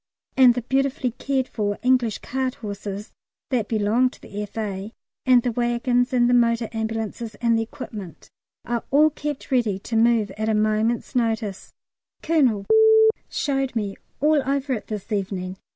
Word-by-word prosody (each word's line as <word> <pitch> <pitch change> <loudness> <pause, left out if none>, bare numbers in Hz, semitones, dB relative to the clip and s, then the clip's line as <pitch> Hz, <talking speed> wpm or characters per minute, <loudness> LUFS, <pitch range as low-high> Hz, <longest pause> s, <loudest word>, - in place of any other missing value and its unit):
And 250 -2 +6
the 245 - -3
beautifully 265 0 0
cared 265 +2 -1
for 205 -2 -2
English 250 -4 +2
cart 260 0 -2
horses 205 -1 -6 0.4
that 235 -5 0
belong 225 +3 +2
to - - -17
the 205 +1 -7
F.A., 205 0 -5 0.3
and 250 -2 +6
the 245 - 0
waggons 245 +2 +1
and 245 -2 +3
the 245 - +3
motor 235 -1 +2
ambulances 225 0 -4
and 230 +1 +1
the 225 - +1
equipment, 205 -6 -8 0.4
are 235 -1 -2
all 305 +3 +5
kept 295 -2 -5
ready 230 -7 +2
to 225 +4 -6
move 225 -3 +3
at 220 0 0
a 220 - +2
moment's 215 +4 0
notice. 225 -5 -1 0.5
Colonel 255 -11 +2 0.6
showed 270 -3 -1
me 205 -3 -2 0.2
all 300 +1 +3
over 275 0 -1
it 220 - -5
this 215 0 -6
evening. 190 -2 -3
230 Hz, 155 wpm, -23 LUFS, 210-255 Hz, 0.6 s, And